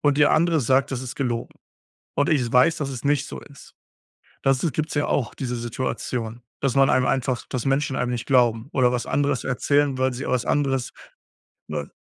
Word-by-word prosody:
und 145 -1 +2
der 150 - +5
andere 165 -1 +3
sagt, 130 +3 +2
das 130 0 -3
ist 125 - -7
gelogen 120 -3 -3 0.6
und 145 - +1
ich 150 -6 +3
s 120 +1 -4
weiß, 125 +6 +5
dass 140 -2 -3
es 125 - -6
nicht 145 0 +1
so - - -7
ist. 140 -2 -15 0.7
Das 135 -1 +2
ist 160 - 0
gibt's 155 0 -2
ja 145 - +1
auch 120 -6 -1
diese 125 -2 -3
Situation, 120 -1 -4 0.2
dass 135 -3 0
man 135 0 +5
einem 130 - +3
einfach 130 -2 0
dass 125 -1 -3
Menschen 135 0 +1
einem 125 0 -1
nicht 120 -2 -3
glauben 120 -1 +2
oder 125 -2 +3
was 125 -1 -2
anderes 145 -3 0
erzählen, 140 +1 +1
weil 130 -1 +1
sie 125 - -5
au - - -2
was 125 -2 0
anderes, 135 -4 0 0.8
äh 70 - -4
130 Hz, 210 wpm, -23 LUFS, 125-145 Hz, 0.8 s, der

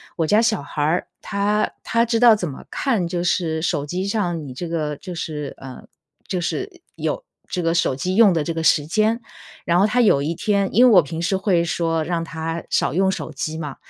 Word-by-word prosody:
我 165 - 0
家 210 +6 +4
小 230 - +1
孩 145 +1 -5
儿， 160 +4 +1
他 205 +1 0
他 230 0 +2
知 230 -1 0
道 240 -2 +8
怎 185 -4 -3
么 135 - -9
看 230 -10 0
就 175 0 -2
是 165 -3 0
手 145 -3 -1
机 180 +5 -3
上 175 -7 -2
你 130 - -8
这 170 +5 -6
个 155 -3 -2
就 180 +5 -8
是， 150 -4 -5
呃 130 -2 -10 0.4
就 185 - -2
是 370 - -4
有 - - -3 0.2
这 180 - -2
个 165 0 +1
手 170 -6 +1
机 180 +8 -2
用 220 -2 +6
的 160 -3 0
这 165 - -2
个 165 - -3
时 150 -2 +4
间。 215 +6 +1 0.5
然 170 +1 +3
后 200 - +5
他 245 +3 +2
有 200 -11 +4
一 155 +3 -1
天 200 +1 0
因 240 - +7
为 245 - +6
我 - - +9
平 160 +2 -6
时 185 +3 0
会 190 -3 +2
说 165 -1 -1
让 170 0 -2
他 165 0 -4
少 - - +1
用 190 +2 +2
手 175 - -5
机 155 +2 -4
嘛， 150 -4 -5
175 Hz, 240 characters per minute, -21 LUFS, 160-200 Hz, 0.5 s, 我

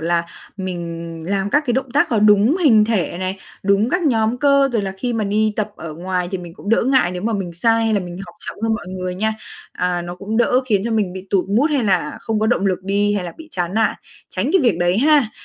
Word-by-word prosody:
là 170 +1 +1 0.3
mình 175 -3 -4 0.3
làm 195 0 -1
các 295 +6 +3
cái 240 - +1
động 265 0 -1
tác 290 - +3
có 225 - +1
đúng 210 - +5
hình 220 -7 +6
thể 210 -6 -1
này, 185 +1 -3 0.2
đúng 200 +4 +2
các 360 +3 +1
nhóm 230 -5 +1
cơ. 280 0 +4
Rồi 220 -3 +1
là 190 -1 -3
khi 245 +1 -2
mà 220 -2 -1
đi 215 +2 +1
tập 210 -1 -1
ở 155 -2 -7
ngoài 180 +1 -2
thì 190 - -2
mình 175 -1 -10
cũng 205 - -10
đỡ 230 - +3
ngại 260 -10 +3
nếu 180 +1 -5
mà 230 +1 0
mình 190 -4 -3
sai 225 +6 +2
hay 220 -1 +1
là 200 - +2
mình 175 -1 -7
học 175 - -13
chậm - - -6
hơn 225 -1 +1
mọi 200 - -6
người 185 -1 -4
nha. 220 +3 -1 0.4
À, 180 -1 -1
nó 175 0 -6
cũng 200 +5 -4
đỡ 250 +2 +3
khiến 205 -5 +2
cho 235 - -2
mình 210 -5 0
bị 190 0 -8
tụt 190 -2 +2
mood 255 +10 +2
hay 275 -6 +1
là 180 -7 0
không 220 -1 -2
có 220 - +2
động 210 -4 +1
lực 185 -2 +1
đi 205 +1 +1
hay 195 -3 -2
là 170 - -6
bị 320 -1 -11
chán 180 - -3
nản, 220 -1 +2 0.3
tránh 195 +8 -2
cái 380 - +5
việc 225 -9 +2
đấy 175 +3 +2
ha. 285 -4 +4
205 Hz, 270 wpm, -20 LUFS, 180-230 Hz, 0.4 s, hình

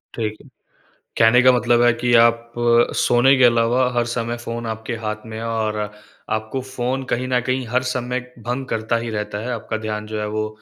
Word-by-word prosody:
ठीक 110 -2 -3
है। - - -17 0.7
कहने 115 +2 +6
का 130 0 +7
मतलब 120 -1 +3
है 120 -1 +5
कि 120 0 +1
आप 115 0 +1 0.4
अ, - - -8
सोने 130 +3 +4
के 130 - +5
अलावा 120 +2 +3
हर 120 -1 +1
समय 120 0 -2
फ़ोन 115 0 -4
आपके 110 +1 -4
हाथ 105 +1 -4
में 110 0 -7
है 115 - -5
और 110 -1 -1 0.6
आपको 110 +5 -4
फ़ोन 130 0 -3
कहीं 130 +1 -1
न 125 -1 +2
कहीं 130 -1 -1
हर 125 +3 0
समय 125 0 -2 0.3
भंग 130 +2 -2
करता 110 +1 -1
ही - - -3
रहता 105 -1 -4
है - - -3
आपका 110 -1 -4
ध्यान 105 0 -4
जो 110 0 -4
है, 105 - -2
वो 110 0 -2
115 Hz, 210 wpm, -21 LUFS, 110-125 Hz, 0.7 s, का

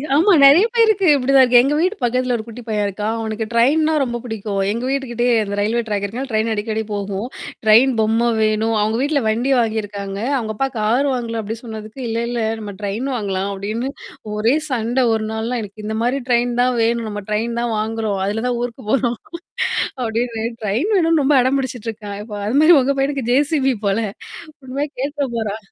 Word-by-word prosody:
ஆமா 345 +8 +4
நெறைய 290 +9 +8
பேருக்கு 435 -4 +4
இப்படிதான் 270 0 +4
இருக்கு. 245 -1 +6
எங்க 275 +3 +1
வீட்டு 370 +6 +1
பக்கத்தில 250 +1 +1
ஒரு 220 - -4
குட்டி 235 +1 -9
பையன் 210 -1 0
இருக்கா. 205 +2 -4
அவனக்கு 220 0 -3
ட்ரெயின்னா 300 +7 +3
ரொம்ப 240 -2 -3
புடிக்கும். 215 -4 -4
எங்க 230 +3 -3
வீட்டுகிட்டயே 245 -3 0
அந்த 200 -1 -4
ரயில்வே 220 +4 +1
ட்ராக் 205 -2 -2
இருக்கர்ன்னால 245 +7 -4
ட்ரெயின் 220 +1 +1
அடிக்கடி 220 +1 -2
போகும். 200 +2 -3 0.4
ட்ரெயின் 225 +5 +6
பொம்ம 225 +2 +2
வேணும். 220 +1 +1
அவங்க 215 +2 0
வீட்ல 285 0 +1
வண்டி 240 +5 0
வாங்கியிருக்காங்க. 205 -3 -3 0.2
அவுங்க 220 -3 -3
அப்பா 270 +5 0
கார் 240 +7 +2
வாங்கலாம் 230 -2 -3
அப்டின் 220 +2 -6
சொன்னதுக்கு, 220 +1 -8
இல்லல்ல 235 +1 -2 0.2
நம்ம 205 -1 -6
ட்ரெயின் 210 +6 -3
வாங்கலாம் 195 -3 -2
அப்படின்னு 215 +6 -3 0.5
ஒரே 225 +5 +2
சண்ட 240 0 -1
ஒரு 220 -1 -1
நாள்லாம் 225 +2 -2
எனக்கு 210 +1 -10
இந்த 220 +1 -3
மாரி 250 +3 +1
ட்ரெயின் 240 0 +2
தான் 250 0 +2
வேணும், 230 0 +1
நம்ம 205 -1 -5
ட்ரெயின் 230 +3 -1
தான் 240 -1 -1
வாங்குறோம். 220 -2 -2
அதுல 225 +4 -2
தான் 245 -1 -1
ஊருக்கு 245 +1 -5
போறோம். 240 -3 +1 0.8
அப்படின்னு 230 -1 -2 0.2
ட்ரெயின் 225 - 0
வேணும்னு 330 -4 +3
ரொம்ப 285 +2 +3
அடம் 260 +2 +2
பிடிச்சுட்டுருக்கான். 225 -5 -5
இப்ப 210 -1 -7
அது 240 +6 +1
மாரி 320 +3 +7
உங்க 275 +2 0
பையனுக்கு 270 -3 -1
ஜேசிபி 275 -1 +2
போல. 200 +2 +1 0.7
உண்மையா 280 +3 -3
கேட்டுற 285 0 -2
போறா. 215 -2 -2
230 Hz, 180 wpm, -19 LUFS, 215-260 Hz, 0.8 s, நெறைய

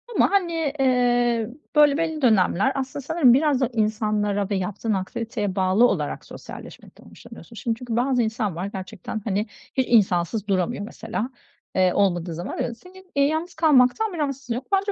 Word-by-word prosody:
ama, - - +3
hani, 335 -7 0
eee, 245 -3 +2 0.3
böyle 295 -1 +6
belli 320 -1 -2
dönemler 215 -1 +3
aslında 270 0 -4
sanırım 305 -5 +4
biraz 280 0 +2
da 255 - +2
insanlara 210 -2 0
ve 205 - 0
yaptığın 200 +3 -2
aktiviteye 210 +1 -3
bağlı 190 +5 +4
olarak - - -2
sosyalleşmekten - - -12
hoşlanıyorsun. 235 - -13
Şimdi 230 +1 -2
çünkü 240 -3 -4
bazı 250 +1 +2
insan 220 -4 -2
var 180 +3 -3
gerçekten, 195 +2 -6
hani, 205 0 0 0.3
hiç 260 -1 +1
insansız 200 -1 +2
duramıyor 195 +2 0
mesela, 225 +2 -5 0.5
eee, 185 -1 +3
olmadığı 175 -4 +1
zaman 175 +3 -4
öyle. 235 - -4
Senin, 370 +8 -17
eee, 280 - +4
yalnız 315 +4 -1
kalmaktan 315 - +3
bir 345 - -6
rahatsızlığın 275 -5 -2
yok. 250 +2 -6
Bence 395 +1 +2
235 Hz, 165 wpm, -23 LUFS, 205-280 Hz, 0.5 s, böyle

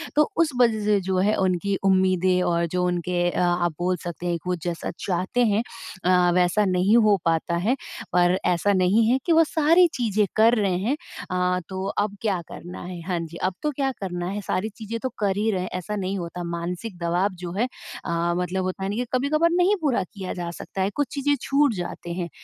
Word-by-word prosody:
तो 300 0 +4
उस 335 -2 +4
वजह 220 -3 +3
से 210 -1 +3
जो 185 0 -1
है 205 +3 +3
उनकी 190 +1 +1
उम्मीदें 185 -1 +3
और 170 0 +1
जो 180 +2 -1
उनके 180 0 -1
अ, - - -2 0.2
आप 175 -1 +1
बोल 180 +1 +1
सकते 175 0 -6
हैं 170 - +1
कि - - -18
वो 180 - +1
जैसा 170 -1 -3 0.2
चाहते 190 +7 +1
हैं 210 +1 +2 0.4
अ, 180 -1 +4
वैसा 180 +4 +3
नहीं 185 +4 +3
हो 215 -3 +5
पाता 165 +1 +1
है 215 +9 +1 0.4
पर 180 +1 +4
ऐसा 180 +3 +2
नहीं 190 +5 +3
है 255 - +4
कि 340 - +1
वो 325 0 +6
सारी 330 +3 +4
चीज़ें 215 -4 +1
कर 225 +2 +5
रहे 195 -5 +1
हैं। 240 +9 0 0.4
अ, 180 0 +1
तो 190 0 -4
अब 205 0 -1
क्या 195 -6 0
करना 175 +1 -8
है? 180 -1 -7
हाँ 180 -2 0
जी, 165 0 -7
अब 185 - +1
तो 300 - +1
क्या 270 -1 -1
करना 175 -2 -3
है, 205 +1 -3
सारी 200 +3 -2
चीज़ें 230 +1 -5
तो 260 - 0
कर 200 -1 +1
ही 220 +2 +1
रहे 185 -2 -1
हैं, 185 - -4
ऐसा 185 +3 -3
नहीं 195 0 -2
होता। 175 0 -5
मानसिक 175 +4 -4
दवाब 180 +3 0
जो 170 - -4
है, 230 +6 0 0.4
अ, 170 0 0
मतलब 180 +1 -1
होता 185 +1 -3
है 195 - -1
ना 205 - -2
कि 245 +1 -1
कभी-कभार 305 +6 +2
नहीं 360 +4 +3
पूरा 265 -10 +1
किया 190 -3 -5
जा 175 -1 -4
सकता 190 - -5
है, 190 - +2
कुछ 290 -2 0
चीज़ें 285 0 +1
छूट 280 -3 +2
जाते 175 -1 -5
हैं। 175 -1 -3
190 Hz, 220 wpm, -24 LUFS, 180-220 Hz, 0.4 s, वो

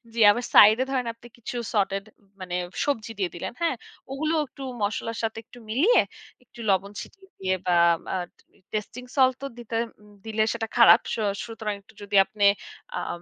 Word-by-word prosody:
জ্বী, 230 - 0
আবার 240 +3 -2
সাইড 215 +2 +9
এ - - -5
ধরেন 255 -2 0
আপনি 230 +1 -16
কিছু 235 +1 -7 0.2
সটেড, 195 -1 +1 0.4
মানে 180 -1 -4 0.3
সবজি 230 -6 -1
দিয়ে 185 -2 0
দিলেন। 170 - -5
হ্যাঁ? 330 -5 +1 0.4
ওগুলো 310 +4 -1
একটু 270 +1 -11 0.2
মসলার 225 +2 -2
সাথে 225 0 -2
একটু 245 - -15
মিলিয়ে, 330 - +4 0.4
একটু 240 - -19
লবণ 195 +1 +1
ছিটিয়ে 385 -1 -14
দিয়ে 190 0 0
বা 180 -1 +3 0.4
আ - - 0 0.2
টি - - -29
টেস্টিং 215 +4 -4
সল্ট 260 -1 +5
তো - - -2
দিতে 235 -1 -6 0.5
দিলে, 220 -1 +1
সেটা 225 -1 -3
খারাপ। 235 - +9
স - - 0 0.3
সুতরাং 220 -2 -4
একটু 195 - -22
যদি 205 0 -4
আপনে 205 0 0 0.5
আম 175 - -4
225 Hz, 175 wpm, -25 LUFS, 200-250 Hz, 0.5 s, সাইড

